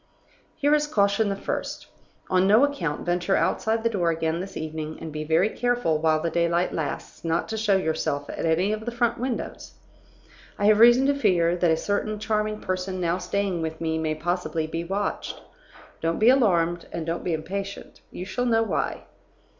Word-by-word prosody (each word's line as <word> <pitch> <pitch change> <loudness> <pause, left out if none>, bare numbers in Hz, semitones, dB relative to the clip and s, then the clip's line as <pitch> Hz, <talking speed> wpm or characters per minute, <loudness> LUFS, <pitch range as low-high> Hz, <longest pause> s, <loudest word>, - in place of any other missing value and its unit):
"Here 290 +1 +2
is 300 0 +2
caution 200 -4 +2
the 200 - -1
first. 195 - -4 0.4
On 185 0 +3
no 215 +6 +6
account 180 - -1
venture 175 +2 +1
outside 225 +1 +1
the - - +3
door 180 -6 0
again 160 0 -1
this 190 +2 -6
evening, 155 0 -5
and 160 - -7
be 155 0 -3
very 160 +6 +2
careful, 240 -11 0
while 155 0 +2
the 165 +1 -2
daylight 170 +1 +1
lasts, 155 -3 -5
not 165 0 0
to 220 - -2
show 210 -2 +3
yourself 155 -4 -1
at - - -5
any 165 +5 +2
of 215 0 -3
the 240 - -2
front 235 -1 0
windows. 250 -1 -4 0.8
I 205 - 0
have 210 0 +5
reason 240 +3 +7
to 285 - +3
fear 175 -11 +2
that 175 -1 +2
a 160 - +3
certain 210 +3 -1
charming 215 0 -1
person 185 0 -3
now 175 0 0
staying 185 -1 -1
with 160 0 -4
me 160 -1 -1
may 155 -1 -1
possibly 170 0 -2
be 165 +1 -4
watched. 195 +4 -3 0.6
Don't 165 0 0
be 220 - +5
alarmed, 175 -10 +3
and 165 -1 -4
don't 165 +1 -3
be 175 - -1
impatient; 195 +5 -6
you 180 - -7
shall 245 +6 -2
know 225 -1 +3
why. 225 - -2
185 Hz, 190 wpm, -25 LUFS, 165-215 Hz, 0.8 s, reason